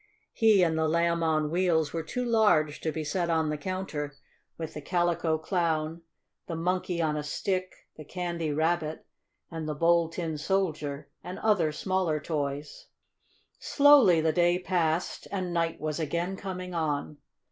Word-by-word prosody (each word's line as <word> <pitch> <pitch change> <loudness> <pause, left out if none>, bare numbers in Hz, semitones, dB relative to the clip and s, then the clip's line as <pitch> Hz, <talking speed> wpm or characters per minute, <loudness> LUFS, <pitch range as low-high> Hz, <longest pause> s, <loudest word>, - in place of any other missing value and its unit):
He 215 -4 +5
and 160 -2 +1
the 160 - +2
Lamb 170 +1 +1
on 155 -2 +1
Wheels 165 -4 +1
were 165 - -1
too 250 +9 -3
large 210 -11 +3
to 160 - -1
be 155 0 -4
set 170 +3 -1
on 160 -2 +1
the - - -1
counter 150 -4 -4 0.4
with 160 -2 -6
the 150 - -6
Calico 170 0 +1
Clown, 165 -1 -1 0.5
the 165 - -4
Monkey 180 +1 -1
on 155 -1 0
a 150 - -1
Stick, 185 +5 -2 0.2
the 155 - -8
Candy 170 -1 -3
Rabbit 160 +1 -1 0.5
and 160 -2 -4
the 150 - -2
Bold 170 +1 +3
Tin 160 -4 -3
Soldier 155 -6 -2
and 180 - -6
other 195 -8 +2
smaller 180 -1 0
toys. 145 -1 -4 0.7
Slowly 280 - +6
the 160 0 +1
day 175 +1 +3
passed, 175 -2 -1
and 185 -3 -2
night 165 -1 0
was 155 0 -3
again 170 +4 -2
coming 185 -2 -6
on. 150 -2 -2
165 Hz, 160 wpm, -28 LUFS, 155-180 Hz, 0.7 s, Slowly